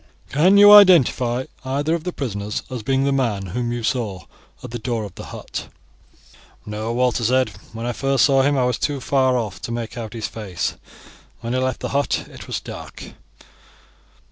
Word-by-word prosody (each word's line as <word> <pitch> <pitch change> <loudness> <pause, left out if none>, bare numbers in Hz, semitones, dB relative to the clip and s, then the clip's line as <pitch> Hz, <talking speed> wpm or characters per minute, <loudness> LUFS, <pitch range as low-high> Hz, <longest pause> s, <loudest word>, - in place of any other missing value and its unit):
"Can 180 +8 +4
you 205 0 +9
identify 135 - +6 0.2
either 140 +4 -1
of 170 0 -2
the 180 - -2
prisoners 105 - -4
as 125 -3 -4
being 135 +3 +1
the 140 - +1
man 115 -8 0
whom 120 -1 -2
you 120 -1 -3
saw 110 -6 -2 0.4
at - - -8
the 120 - -5
door 115 -1 -2
of 100 -4 -8
the - - -9
hut?" - - -7 1.0
"No," 105 +2 -4
Walter 125 0 +1
said. 130 +1 +2 0.2
"When 115 +1 -6
I 120 - -1
first 135 -3 +2
saw 135 0 +4
him 140 +1 +2
I 125 - +2
was 125 -1 -1
too 145 -2 -1
far 130 -1 +2
off 105 -5 -4
to - - -5
make 120 0 -5
out 110 -1 -6
his 115 -2 -3
face. 100 -6 -4 0.7
When 120 0 -3
he 130 - +1
left 130 0 -2
the - - -3
hut 140 +1 -1
it - - -11
was - - -3
dark." - - -10
125 Hz, 195 wpm, -21 LUFS, 115-135 Hz, 1.0 s, you